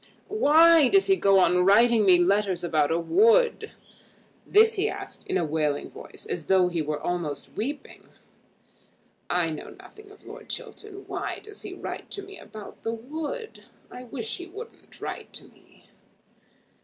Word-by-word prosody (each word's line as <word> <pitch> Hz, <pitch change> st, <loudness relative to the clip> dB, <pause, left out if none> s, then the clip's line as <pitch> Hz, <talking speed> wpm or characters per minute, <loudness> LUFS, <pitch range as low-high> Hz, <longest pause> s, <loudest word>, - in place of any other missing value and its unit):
"Why 330 Hz, -5 st, +6 dB
does 390 Hz, +5 st, +4 dB
he 390 Hz, -, +4 dB
go 195 Hz, -, +3 dB
on 180 Hz, -1 st, +4 dB
writing 220 Hz, +2 st, +4 dB
me 180 Hz, -1 st, +7 dB
letters 190 Hz, 0 st, +1 dB
about 155 Hz, -4 st, +1 dB
a 165 Hz, -, +1 dB
wood?" 455 Hz, -, +3 dB, 0.8 s
This 445 Hz, +2 st, +5 dB
he 420 Hz, +1 st, 0 dB
asked -, -, -8 dB
in 380 Hz, -, 0 dB
a 170 Hz, -, 0 dB
wailing 150 Hz, -2 st, -2 dB
voice, -, -, -10 dB
as 165 Hz, -4 st, -4 dB
though 185 Hz, -2 st, +4 dB
he 170 Hz, -2 st, -2 dB
were 150 Hz, 0 st, -3 dB
almost 170 Hz, -4 st, -4 dB
weeping. 275 Hz, +7 st, -6 dB, 1.2 s
"I 175 Hz, -2 st, +1 dB
know 155 Hz, -, -7 dB
nothing 430 Hz, -1 st, -15 dB
of 410 Hz, 0 st, -18 dB
Lord -, -, -11 dB
Chiltern. 395 Hz, -2 st, -8 dB
Why -, -, -4 dB
does 420 Hz, -1 st, -11 dB
he -, -, -8 dB
write -, -, -7 dB
to 400 Hz, -, -4 dB
me 395 Hz, 0 st, -11 dB
about 215 Hz, -1 st, -11 dB
the 225 Hz, -, -3 dB
wood? 315 Hz, -, -7 dB, 0.3 s
I 250 Hz, -, -9 dB
wish 235 Hz, -2 st, -5 dB
he 355 Hz, -, -9 dB
wouldn't 435 Hz, +6 st, -12 dB
write -, -, -7 dB
to -, -, -6 dB
me." -, -, -25 dB
230 Hz, 165 wpm, -26 LUFS, -, 1.2 s, me